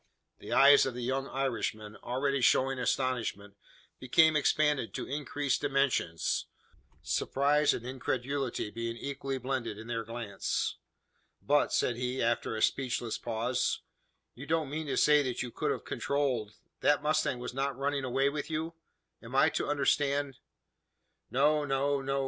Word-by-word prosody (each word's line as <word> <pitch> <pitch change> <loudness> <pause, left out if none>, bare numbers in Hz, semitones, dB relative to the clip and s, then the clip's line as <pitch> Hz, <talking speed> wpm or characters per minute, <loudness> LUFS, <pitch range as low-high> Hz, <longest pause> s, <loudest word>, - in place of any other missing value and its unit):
The - - -9
eyes 140 0 +7
of 130 - -4
the 125 - -4
young 135 +2 -1
Irishman, 115 -5 -3
already 140 +2 -1
showing 130 +2 +3
astonishment, 120 -6 -1 0.4
became 155 +5 +4
expanded 150 -4 +2
to - - -3
increased 145 0 -2
dimensions 135 -12 0 0.6
surprise 145 +2 +2
and 120 - -4
incredulity 130 -2 -2
being 115 +1 -4
equally 135 0 -4
blended 125 -4 -3
in 110 - -9
their 115 -1 -3
glance. 110 -3 -3 0.6
"But," 145 +1 +2
said 120 - +1
he, 125 +1 -2
after 115 -1 0
a 110 - -1
speechless 125 -4 0
pause, 120 +2 -1 0.5
"you 140 +4 -10
don't 160 -4 0
mean 155 +1 -3
to 140 - -1
say 150 0 +5
that 130 -3 -2
you 125 - -6
could - - -2
have - - -2
controlled 125 -7 -1 0.2
that 145 - +4
the 145 - -12
mustang 155 -4 +1
was 125 0 -6
not 135 0 -2
running 140 0 -1
away 135 +2 +1
with 145 +2 -3
you? 160 +1 -3 0.5
Am - - -9
I - - +5
to - - -2
understand 140 -1 +1 0.5
" - - -50
"No 150 +3 +3
no 140 0 0
no!" 135 0 -1
135 Hz, 155 wpm, -30 LUFS, 120-145 Hz, 0.6 s, eyes